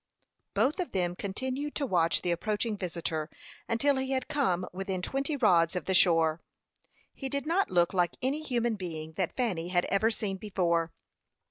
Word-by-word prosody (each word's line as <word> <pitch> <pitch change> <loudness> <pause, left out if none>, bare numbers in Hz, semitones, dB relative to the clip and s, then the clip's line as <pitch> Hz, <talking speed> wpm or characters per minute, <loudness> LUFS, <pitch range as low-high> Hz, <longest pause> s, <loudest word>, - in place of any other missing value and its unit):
Both 295 +8 +2
of 360 - -3
them 175 -2 0
continued 260 +10 -4
to 285 - 0
watch 170 -8 +2
the 175 - +1
approaching 210 +5 -1
visitor, 170 -4 -3 0.4
until 275 +4 +2
he 265 0 -1
had 260 -1 -1
come 260 - +1
within 190 0 -3
twenty 275 - -1
rods 175 -8 +4
of 180 - -2
the 190 - 0
shore. 165 -3 +4 0.7
He 270 - -5
did 280 +2 -2
not 350 +5 +2
look 175 0 +3
like 175 -2 +1
any 275 +4 -1
human 240 -6 0
being 160 -4 -5
that 185 0 -2
Fanny 190 -10 0
had 175 0 +2
ever 210 +3 +3
seen 205 -4 -2
before. 170 -5 0
195 Hz, 170 wpm, -30 LUFS, 175-260 Hz, 0.7 s, rods